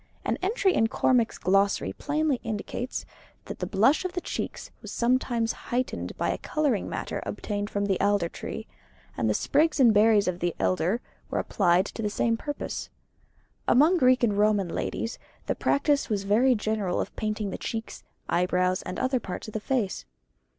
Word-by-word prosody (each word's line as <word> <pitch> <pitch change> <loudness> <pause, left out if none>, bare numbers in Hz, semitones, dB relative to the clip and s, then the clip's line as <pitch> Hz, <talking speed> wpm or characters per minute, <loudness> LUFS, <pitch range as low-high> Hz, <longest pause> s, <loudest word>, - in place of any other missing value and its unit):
An - - 0
entry 385 -1 +2
in 225 - +3
Cormac's 235 0 +2
Glossary 195 +2 +2
plainly 300 -2 0
indicates 230 +3 -4 0.4
that - - -7
the - - -2
blush 265 - +3
of 370 -1 -3
the 360 - -2
cheeks - - -5
was - - -8
sometimes 235 -1 +1 0.2
heightened 250 +1 -2
by - - 0
a - - -3
colouring 290 -9 0
matter - - -4
obtained 205 -1 -3
from 200 -1 -1
the 195 -2 0
alder 200 -3 +2
tree: - - -7 0.5
and 110 - 0
the 105 - +2
sprigs 305 +2 +2
and 240 -4 +6
berries 210 -1 +5
of 180 -1 -1
the 175 -1 -1
elder 160 - +1 0.3
were - - -2
applied 175 +2 +2
to 225 - -6
the 210 - 0
same 230 +2 +1
purpose. 290 +5 -5 0.8
Among 305 +9 +5
Greek 255 -2 +4
and 210 -4 +3
Roman 205 -3 +2
ladies 225 - -3 0.3
the - - 0
practice 285 0 +1
was 205 -3 0
very 235 +6 +4
general 210 -4 -1
of - - -4
painting 215 -2 -2
the - - -5
cheeks, 225 0 -5 0.2
eyebrows, 180 +1 +1
and 185 - -6
other 255 0 +1
parts 190 +1 -6
of - - -12
the 215 - -1
face. 210 - -1
220 Hz, 175 wpm, -27 LUFS, 195-255 Hz, 0.8 s, and